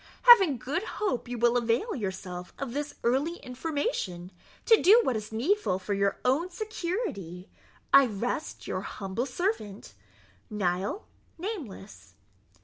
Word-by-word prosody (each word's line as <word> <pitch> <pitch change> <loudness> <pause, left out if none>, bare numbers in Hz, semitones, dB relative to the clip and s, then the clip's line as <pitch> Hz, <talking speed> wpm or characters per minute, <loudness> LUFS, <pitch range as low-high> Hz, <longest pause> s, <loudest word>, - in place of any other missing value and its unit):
Having 390 - +8
good 285 +9 -2
hope 385 - -3
you 245 0 -4
will 240 +1 +3
avail 240 - +1
yourself 190 -5 -6
of 270 -4 -5
this 290 +1 -4
early 275 +8 +1
information, 255 - -3 0.3
to 450 -2 +6
do 415 +6 +7
what 260 - 0
is 215 0 -5
needful 250 - +1
for 190 +2 -3
your 200 0 +1
own 290 +8 +2
security, 345 - -4 0.5
I 275 -1 +8
rest 240 +8 -4
your 185 - -3
humble 200 +5 -4
servant, 250 - -3 0.6
NIHIL 200 - -1 0.3
NAMELESS. 320 - -7
245 Hz, 130 wpm, -28 LUFS, -, 0.6 s, Having